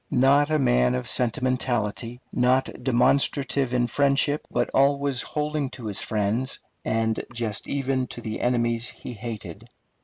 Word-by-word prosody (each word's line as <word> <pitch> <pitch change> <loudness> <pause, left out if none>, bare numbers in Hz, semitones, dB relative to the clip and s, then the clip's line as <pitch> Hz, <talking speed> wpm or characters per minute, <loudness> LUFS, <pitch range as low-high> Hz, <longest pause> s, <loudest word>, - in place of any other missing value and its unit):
Not 140 +3 +4
a 155 - +2
man 60 - +3
of 65 - -3
sentimentality, 120 -1 0
not 130 +1 +2
demonstrative 135 +1 +2
in 125 -1 +2
friendship, 140 +3 +1
but - - -1
always 140 -1 +2
holding 150 -2 -2
to 120 - -9
his 105 -3 -2
friends, 110 +5 -1 0.3
and 110 0 0
just 110 -3 -3
even 135 -2 -1
to - - -8
the 110 -2 -5
enemies 120 -1 +1
he 125 - -8
hated. 110 -6 -7
125 Hz, 140 wpm, -25 LUFS, 115-135 Hz, 0.3 s, Not